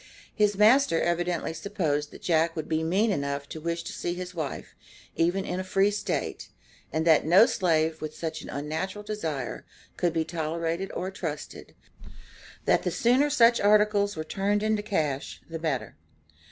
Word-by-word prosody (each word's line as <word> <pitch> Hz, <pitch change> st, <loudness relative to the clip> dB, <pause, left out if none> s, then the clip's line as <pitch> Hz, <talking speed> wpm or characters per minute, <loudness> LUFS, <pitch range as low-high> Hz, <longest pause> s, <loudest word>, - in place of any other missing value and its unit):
His 210 Hz, -2 st, +2 dB
master 215 Hz, -3 st, +5 dB
evidently 175 Hz, -1 st, -1 dB
supposed 160 Hz, -5 st, -2 dB
that -, -, -14 dB
Jack 165 Hz, -1 st, +2 dB
would 160 Hz, -, -4 dB
be 160 Hz, 0 st, 0 dB
mean 195 Hz, +7 st, +2 dB
enough 140 Hz, -4 st, -2 dB
to 160 Hz, -, -7 dB
wish 170 Hz, +1 st, -2 dB
to -, -, -6 dB
see 175 Hz, -, -3 dB
his 180 Hz, 0 st, -6 dB
wife, 155 Hz, -5 st, -5 dB, 0.4 s
even 175 Hz, +4 st, +1 dB
in 180 Hz, -, -3 dB
a -, -, -2 dB
free 195 Hz, +2 st, +2 dB
State, 205 Hz, -, -3 dB, 0.4 s
and 160 Hz, +1 st, -1 dB
that 160 Hz, -2 st, +5 dB
no 180 Hz, +8 st, +7 dB
slave, 160 Hz, -6 st, +1 dB
with 155 Hz, 0 st, -5 dB
such 160 Hz, -1 st, -4 dB
an -, -, -10 dB
unnatural 160 Hz, +8 st, -4 dB
desire, 160 Hz, -, -4 dB, 0.3 s
could 175 Hz, -, +1 dB
be 160 Hz, -1 st, -1 dB
tolerated 165 Hz, +2 st, -2 dB
or 185 Hz, +1 st, -3 dB
trusted, 160 Hz, -6 st, -6 dB, 0.9 s
that -, -, +3 dB
the -, -, -1 dB
sooner 255 Hz, +5 st, +3 dB
such 235 Hz, -4 st, +5 dB
"articles" 205 Hz, -1 st, +3 dB
were 155 Hz, -, -3 dB
turned 200 Hz, +5 st, 0 dB
into 215 Hz, -1 st, +1 dB
cash 155 Hz, -10 st, -2 dB
the 165 Hz, 0 st, -6 dB
better. 135 Hz, -10 st, -2 dB
170 Hz, 165 wpm, -27 LUFS, 160-205 Hz, 0.9 s, no